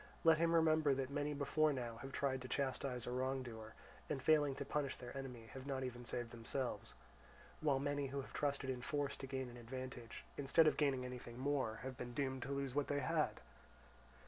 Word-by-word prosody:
Let 160 -1 +7
him 170 0 +4
remember 155 -3 +5
that 135 0 -2
many 145 +1 0
before 150 +2 +3
now 120 -4 -3
have 135 +3 -7
tried 130 -1 0
to 130 - -5
chastise 130 -2 -1
a - - -3
wrongdoer, 125 -4 -2 0.3
and 150 - 0
failing 145 -1 +4
to 140 0 -4
punish 140 -1 0
their 125 +1 -8
enemy 125 -4 -5
have 130 +1 -7
not 135 -2 -1
even 120 -1 -4
saved 120 0 -3
themselves; 120 -1 -3 0.6
while 145 -3 +3
many 145 0 0
who 140 +1 -3
have - - -11
trusted 140 -2 0
in 125 -1 -4
force 145 +1 0
to 135 - -6
gain 130 -1 -2
an 120 0 -9
advantage, 120 -1 -6
instead 145 +3 +5
of 155 - +5
gaining 135 -4 +2
anything 125 -1 -6
more, 130 -5 0
have 130 -1 -4
been 120 -1 -5
doomed 130 -2 0
to 135 - -3
lose 140 -2 -1
what 145 0 +1
they 145 -1 +1
had. 130 - +1
135 Hz, 200 wpm, -40 LUFS, 125-145 Hz, 0.6 s, Let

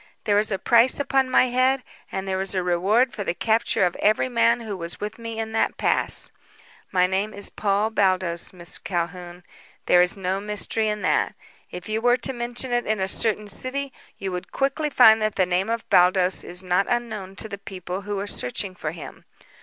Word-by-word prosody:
There 205 -2 +3
is 215 +1 +2
a 195 - 0
price 235 +6 +4
upon 270 -2 +1
my 255 - +5
head, 255 +1 +2 0.3
and 190 0 -4
there 190 0 -1
is 195 0 +1
a 185 - 0
reward 195 +8 +2
for 205 - -4
the 175 - -2
capture 220 -3 +1
of 175 - -1
every 215 +4 +2
man 235 0 +2
who 215 -3 -5
was 170 -2 -6
with 210 +2 -6
me 230 -1 -6
in 220 0 -3
the 225 - +2
pass. - - 0 0.6
My 180 -1 +3
name 195 +3 -1
is 200 - -2
Paul 205 +1 0
Baldos, 185 -5 0
Miss 175 -2 -4
Calhoun. 175 0 -4 0.4
There 180 - +5
is 180 +2 +3
no 190 0 -2
mystery 210 +1 -1
in 210 -1 -2
that. - - +1 0.3
If 180 0 -8
you 215 +1 -2
were 245 +1 +4
to 260 +2 -1
mention 240 +1 -4
it 240 0 0
in 215 -1 0
a 190 - 0
certain 210 +1 0
city, 265 +6 -3 0.2
you 195 -1 -4
would 180 0 -6
quickly 280 +3 -1
find 225 -5 +6
that 215 -1 0
the 185 - +3
name 180 +3 0
of 230 0 -3
Baldos 180 +1 +4
is 180 +1 -5
not 180 +2 +1
unknown 220 -6 -3
to 220 - -5
the 200 -2 -7
people 185 -1 -6
who 205 0 -4
are 200 - -3
searching 185 +2 -2
for 155 -3 -5
him. 165 - -10
205 Hz, 210 wpm, -24 LUFS, 185-230 Hz, 0.6 s, find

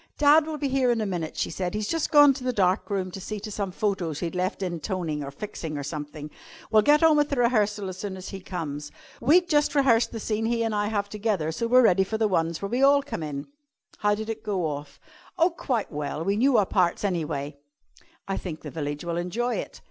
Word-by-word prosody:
"Dad 300 +1 +5
will 310 -1 -4
be 290 - -1
here 265 -1 +2
in 235 -1 +2
a 215 - -1
minute," 175 -5 -4
she - - -1
said. 180 +3 -3
"He's 210 -1 -2
just 330 +4 -1
gone 290 -3 +7
to 260 -1 -8
the 255 - 0
dark 190 -3 +1
room 190 -2 -2
to 190 - -7
see 210 +3 -5
to 215 - -6
some 200 -2 -3
photos 185 -6 -2
he'd 170 -2 -3
left 185 +2 -2
in 175 -2 -3
toning 160 -4 -3
or 140 - -5
fixing, 155 -1 -6
or 145 - -4
something. 150 0 -6 0.4
We'll 215 -1 +6
get 295 +7 +4
on 320 -1 +6
with 295 0 +2
the 280 - 0
rehearsal 215 -5 +1
as 185 0 -7
soon 195 -2 -5
as 185 - -8
he 195 - -6
comes. 150 -6 -5 0.3
We'd 340 +9 +4
just 295 -2 +2
rehearsed 245 -5 +4
the 225 - -5
scene 220 +1 -1
he 230 0 +1
and 225 -1 -1
I 205 0 0
have 205 -2 -1
together, 205 -6 -1
so 230 +8 -2
we're 250 +2 +6
ready 190 -3 +5
for 220 +3 -3
the 220 -1 +2
ones 165 -2 -1
where 200 - -2
we 245 +4 0
all 280 +1 +5
come 280 -11 -5
in." 145 -2 -4 0.5
"How 205 -1 +2
did 215 +1 -5
it 225 -1 -4
go 190 -5 -1
off?" 145 -2 -5 0.4
"Oh, 345 +1 +4
quite 250 -9 -2
well. 150 +1 -3
We 200 +1 +1
knew 250 +3 +3
our 205 - +4
parts, 180 -2 +1
anyway." 150 -7 -2 0.7
"I 195 - -2
think 160 -4 -6
the 150 - -8
village 145 +1 -4
will 170 0 -2
enjoy 230 +8 -1
it." - - -6
200 Hz, 245 wpm, -26 LUFS, 170-235 Hz, 0.7 s, gone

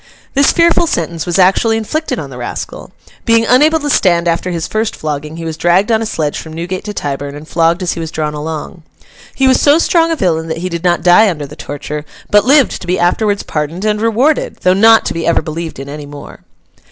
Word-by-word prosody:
This 280 0 +4
fearful 340 0 +3
sentence 170 - -3
was 175 - 0
actually 195 +4 +3
inflicted 310 +9 -3
on - - -6
the - - -9
rascal. - - -6 0.3
Being 230 -1 +3
unable 300 +7 +4
to 290 - -2
stand 175 -6 +2
after 170 +2 0
his 165 -2 -3
first 220 0 -2
flogging, 150 +1 -5
he 165 - -6
was 160 -1 -5
dragged 180 +6 +2
on 220 0 +2
a 225 - -2
sledge 150 -7 -2
from 160 - -9
Newgate 175 +3 -5
to 210 - -5
Tyburn, 140 -1 -4
and 150 +1 -10
flogged 170 +2 +1
as 180 - 0
he - - -5
was 165 -1 -4
drawn 155 -2 -3
along. 155 +3 -6 0.5
He 270 - +2
was 260 - +3
so 290 +1 +5
strong 335 0 +2
a 330 - 0
villain 165 - -1
that 160 0 -3
he 180 +2 -4
did 170 -1 -5
not 175 -1 +1
die 180 +5 +6
under 150 -5 -4
the 145 +2 -11
torture, 150 +1 -6 0.3
but 205 0 +4
lived 275 0 +3
to 180 - -9
be 180 +1 +1
afterwards 200 +4 +1
pardoned 155 +6 -4
and 210 0 0
rewarded, 240 +7 +1
though 185 - +3
not 225 +3 +5
to - - -2
be 165 0 -3
ever 170 - +2
believed 165 +1 -6
in 135 +1 -8
any 145 0 -8
more. 145 0 -11
175 Hz, 230 wpm, -14 LUFS, 160-225 Hz, 0.5 s, die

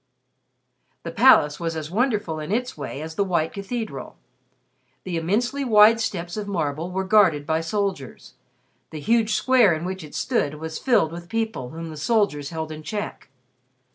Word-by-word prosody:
The - - -5
Palace 150 0 +5
was 165 -1 -3
as 155 0 -5
wonderful 210 -7 0
in 155 +4 -5
its 250 +3 -1
way 145 - -6
as 160 0 -7
the 200 - +1
white 170 -4 0
cathedral. 220 +3 -5 0.9
The 185 -2 -4
immensely 225 +12 0
wide 220 -2 +6
steps 175 -4 -3
of 210 -1 -4
marble 165 -3 -2
were 190 +1 -2
guarded 190 -8 +4
by 160 +1 0
soldiers. 185 - -4 0.6
The 155 - -7
huge 225 +5 +2
square 245 -9 +4
in 155 +2 -5
which 185 -1 -5
it 150 - -11
stood 150 - 0
was 160 +1 -6
filled 230 -12 +2
with 170 +1 -9
people 220 - -2
whom 165 +2 -7
the 155 - -9
soldiers 155 -5 0
held 160 -1 -5
in 155 0 -7
check. 205 -3 -6
180 Hz, 170 wpm, -23 LUFS, 160-215 Hz, 0.9 s, wide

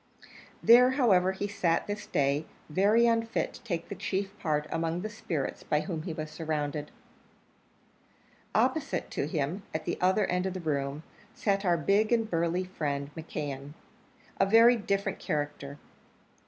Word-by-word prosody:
There, 245 +2 +8
however, 195 -9 +4
he 195 +2 -3
sat 170 -5 +1
on - - -15
this 205 0 -4
day, 140 +2 +1 0.2
very 205 +8 +4
unfit 230 -1 +1
to - - -12
take 170 -7 -4
the - - -5
chief 195 0 -3
part 150 -3 0
among 165 +1 -1
the 215 +2 -4
spirits 165 -9 -3
by 150 - 0
whom 165 -5 -4
he 170 +1 -5
was 155 -1 -5
surrounded. 150 -2 -3 1.7
Opposite - - 0
to 140 - -2
him, 155 +5 -2
at 155 - -3
the 175 - -2
other 190 +3 +3
end 180 +1 0
of 190 - -4
the - - -3
room, 145 -2 -2 0.3
sat 200 -1 0
our 175 -2 +3
big 200 +8 +2
and 225 -2 +2
burly 170 0 0
friend, 145 -6 -3
McKeon, 145 -3 -5 0.7
a 195 - +4
very 230 +4 +7
different 200 -3 -1
character. 145 -1 -3
175 Hz, 155 wpm, -29 LUFS, 150-200 Hz, 1.7 s, There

